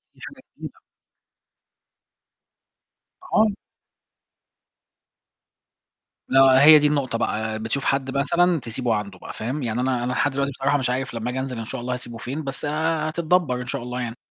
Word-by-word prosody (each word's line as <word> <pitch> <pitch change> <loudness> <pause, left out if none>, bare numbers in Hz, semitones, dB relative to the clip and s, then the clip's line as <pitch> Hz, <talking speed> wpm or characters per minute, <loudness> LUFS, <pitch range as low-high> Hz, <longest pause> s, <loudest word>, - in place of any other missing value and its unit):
دي - - -23
حاجة - - -12 0.2
جميلة. - - -9 2.5
آه. 215 - +5 2.9
آه، 135 0 +6
هي 155 +1 +9
دي 150 - +3
النقطة 140 -5 0
بقى، 110 -1 -2
بتشوف 115 +5 -3
حد 135 0 0
مثلًا 170 +4 +2
تسيبه 120 -1 -2
عنده 100 -3 -5
بقى، - - -9
فاهم؟ 130 +6 -4
يعني 115 0 -1
أنا 125 -1 0
أنا 125 - -1
لحد 145 - +1
دلوقتي 140 +1 -1
بصراحة 140 +2 0
مش 130 -3 -1
عارف 130 +1 -2
لما 115 +1 -3
آجي 130 - -3
أنزل 130 -3 -4
إن 115 - -5
شاء 135 +2 -6
الله 125 +1 -3
هسيبُه 120 -2 -6
فين، 135 +7 -5
بس 135 +1 -4
هتتدبر 155 -1 0
إن 125 - -8
شاء 125 -1 -3
الله 125 +1 -4
يعني. 120 -1 -4
130 Hz, 160 wpm, -23 LUFS, 120-145 Hz, 2.9 s, هي